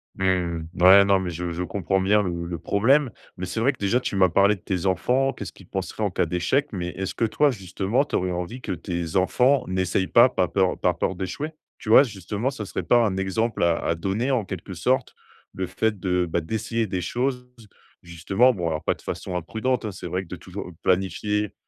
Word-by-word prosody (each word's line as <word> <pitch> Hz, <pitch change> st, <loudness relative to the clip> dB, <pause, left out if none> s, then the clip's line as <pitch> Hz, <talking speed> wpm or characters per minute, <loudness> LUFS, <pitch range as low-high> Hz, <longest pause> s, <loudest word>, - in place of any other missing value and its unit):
Mmh. 90 Hz, -3 st, 0 dB, 0.2 s
Ouais, 95 Hz, +2 st, +8 dB
non, 100 Hz, -1 st, +4 dB
mais 95 Hz, -1 st, -3 dB
je 85 Hz, +1 st, -4 dB
je 85 Hz, +2 st, -4 dB
comprends 95 Hz, +1 st, -1 dB
bien 105 Hz, +2 st, +3 dB
le 85 Hz, -2 st, -3 dB
le 85 Hz, 0 st, -4 dB
problème. 125 Hz, -, +2 dB, 0.3 s
Mais 95 Hz, -, -4 dB
c'est 95 Hz, -, -4 dB
vrai 130 Hz, +5 st, +2 dB
que, -, -, -18 dB
déjà, 105 Hz, +4 st, +1 dB
tu 125 Hz, -, -4 dB
m'as 95 Hz, -1 st, +4 dB
parlé 100 Hz, +4 st, +4 dB
de 95 Hz, -, -18 dB
tes 90 Hz, -1 st, -3 dB
enfants, 125 Hz, +9 st, +1 dB
qu'est-ce 95 Hz, -5 st, -7 dB
qu'ils -, -, -17 dB
penseraient -, -, -4 dB
en -, -, +1 dB
cas -, -, 0 dB
d'échec. 130 Hz, +12 st, 0 dB
Mais 90 Hz, -3 st, -3 dB
est-ce 95 Hz, +1 st, -4 dB
que, 115 Hz, -, 0 dB
toi, 140 Hz, +7 st, +2 dB
justement, 100 Hz, +3 st, -1 dB
tu -, -, -4 dB
aurais 90 Hz, 0 st, 0 dB
envie 90 Hz, +8 st, -5 dB
que -, -, -5 dB
tes 85 Hz, -1 st, -4 dB
enfants 125 Hz, +9 st, +3 dB
n'essayent 95 Hz, 0 st, 0 dB
pas, 120 Hz, +5 st, +6 dB
pas 90 Hz, -7 st, 0 dB
peur 95 Hz, 0 st, 0 dB
par 90 Hz, -1 st, +1 dB
peur 95 Hz, -, -1 dB
d'échouer? 95 Hz, -, -4 dB, 0.3 s
Tu -, -, -8 dB
vois? 115 Hz, -, +8 dB
Justement, 105 Hz, +1 st, -3 dB
ça 130 Hz, -6 st, -6 dB
serait 95 Hz, -, -4 dB
pas 120 Hz, +7 st, +4 dB
un 95 Hz, -3 st, -1 dB
exemple 105 Hz, +5 st, -1 dB
à 85 Hz, -1 st, +3 dB
à 80 Hz, -, -1 dB
donner, 100 Hz, +10 st, -1 dB
en 120 Hz, -6 st, +1 dB
quelque 95 Hz, 0 st, -7 dB
sorte, 125 Hz, +9 st, 0 dB, 0.4 s
le 95 Hz, -1 st, -3 dB
fait 105 Hz, +3 st, -1 dB
de, 90 Hz, -1 st, 0 dB
bah, 85 Hz, -, 0 dB
d'essayer 110 Hz, +5 st, -2 dB
des 95 Hz, -2 st, -2 dB
choses, 125 Hz, +6 st, -2 dB, 0.5 s
justement? 95 Hz, +8 st, +2 dB
Bon 90 Hz, -6 st, -3 dB
alors 80 Hz, -1 st, -2 dB
pas -, -, +1 dB
de -, -, -20 dB
façon 90 Hz, -, -5 dB
imprudente, 115 Hz, +8 st, -2 dB
hein. 105 Hz, -, -3 dB
C'est 95 Hz, -, -8 dB
vrai 95 Hz, +1 st, -2 dB
que -, -, -16 dB
de 90 Hz, -, -6 dB
toujou 90 Hz, 0 st, -8 dB
planifier, 100 Hz, +2 st, 0 dB
95 Hz, 225 wpm, -24 LUFS, 90-115 Hz, 0.5 s, Ouais